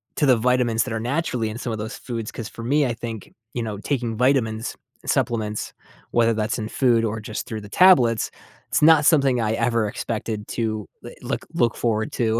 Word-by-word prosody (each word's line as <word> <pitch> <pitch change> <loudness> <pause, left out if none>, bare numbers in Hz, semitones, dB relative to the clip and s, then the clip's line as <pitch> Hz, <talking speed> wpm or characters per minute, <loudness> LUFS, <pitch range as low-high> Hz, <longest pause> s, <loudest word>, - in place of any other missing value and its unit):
to 150 - +2
the 130 -4 +5
vitamins 120 -1 +2
that 125 -3 -5
are 115 - -1
naturally 125 -3 -1
in 110 - -6
some 120 -2 -4
of - - -3
those 110 +1 -5
foods, 115 -3 -5
'cause 115 - -6
for 115 - -9
me, 145 +4 +2
I 120 - 0
think, 115 -2 -7 0.2
you 120 - -2
know, 105 -2 -4
taking 120 0 -2
vitamins 120 -4 +1 0.3
and - - -7
supplements, 110 -2 -1 0.4
whether 115 -1 +3
that's 110 0 -1
in 110 - -3
food 120 -3 +2
or 110 0 -2
just 110 0 -5
through 110 -1 -5
the 105 - -11
tablets, 125 - +5 0.4
it's - - +1
not 155 -1 +6
something 140 -6 +4
I 110 0 0
ever 115 -2 +1
expected 110 0 -4
to, 110 -3 -2 0.2
eh, - - -6
l - - -9
look - - -2
look 115 -2 +2
forward 110 -2 -1
to 115 -1 +1
115 Hz, 215 wpm, -23 LUFS, 110-125 Hz, 0.4 s, not